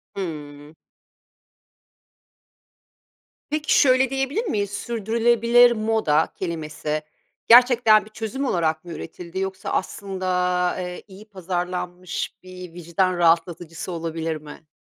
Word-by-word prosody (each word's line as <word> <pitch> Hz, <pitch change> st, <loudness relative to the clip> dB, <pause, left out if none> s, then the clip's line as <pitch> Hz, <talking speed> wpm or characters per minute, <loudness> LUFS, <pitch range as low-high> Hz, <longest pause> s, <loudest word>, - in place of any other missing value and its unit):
Hıı. 150 Hz, -5 st, -7 dB, 2.8 s
Peki, 305 Hz, +1 st, +2 dB
şöyle 260 Hz, -1 st, +4 dB
diyebilir 270 Hz, -, -1 dB
miyiz? 205 Hz, -, -1 dB
"Sürdürülebilir 235 Hz, +2 st, +3 dB
moda" 215 Hz, -9 st, +1 dB
kelimesi 155 Hz, -3 st, -4 dB, 0.5 s
gerçekten 235 Hz, -3 st, +6 dB
bir -, -, -14 dB
çözüm 225 Hz, +6 st, -4 dB
olarak 160 Hz, -6 st, 0 dB
mı 175 Hz, -, -9 dB
üretildi 170 Hz, +3 st, -7 dB
yoksa 190 Hz, 0 st, -4 dB
aslında, 190 Hz, -1 st, -3 dB, 0.5 s
eee, 180 Hz, -1 st, -6 dB
iyi 195 Hz, +1 st, -13 dB
pazarlanmış 180 Hz, -1 st, -4 dB
bir 180 Hz, -2 st, -10 dB
vicdan 175 Hz, +2 st, -1 dB
rahatlatıcısı 170 Hz, 0 st, 0 dB
olabilir 165 Hz, -1 st, -3 dB
mi? 150 Hz, +1 st, -11 dB
185 Hz, 95 wpm, -23 LUFS, 165-225 Hz, 2.8 s, gerçekten